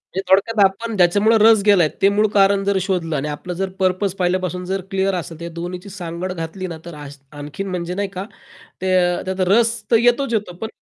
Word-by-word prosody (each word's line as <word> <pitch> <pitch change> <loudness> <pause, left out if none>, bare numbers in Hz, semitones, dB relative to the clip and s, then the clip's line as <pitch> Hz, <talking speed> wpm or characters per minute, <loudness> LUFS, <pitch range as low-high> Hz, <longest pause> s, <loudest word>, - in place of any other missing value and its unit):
म्हणजे 190 - 0
थोडक्यात 205 +3 +3
आपण 220 +4 -2
ज्याच्यामुळे 205 +6 +4
रस 220 -1 +6
गेला. 180 -6 +5
ते 195 - +5
मूळ 210 +1 +2
कारण 195 0 +4
जर 200 -1 +1
शोधलं 175 -5 -2
आणि 145 +2 -2
आपलं 150 +5 -5
जर 195 0 -1
पर्पज 185 +1 +1
पहिल्यापासून 180 0 -1
जर 190 +1 -2
क्लिअर 195 0 0
असेल 165 -2 -6
तर - - -20
त्या 170 0 -6
दोन्हीची 180 +3 -6
सांगड 180 -1 -5
घातली 180 +3 -5
ना, - - -8
तर 170 - -8 0.4
आणखीन 150 +7 -6
म्हणजे 180 -1 -3
नाही 200 - 0
का 190 0 -6 0.6
ते 190 - -1 0.4
त्यात 190 0 -4
रस 230 +2 +4 0.2
तर 230 - +6
येतोच 245 +2 +2
येतो 205 -5 -2
पण 225 - -2
190 Hz, 205 wpm, -20 LUFS, 175-200 Hz, 0.6 s, रस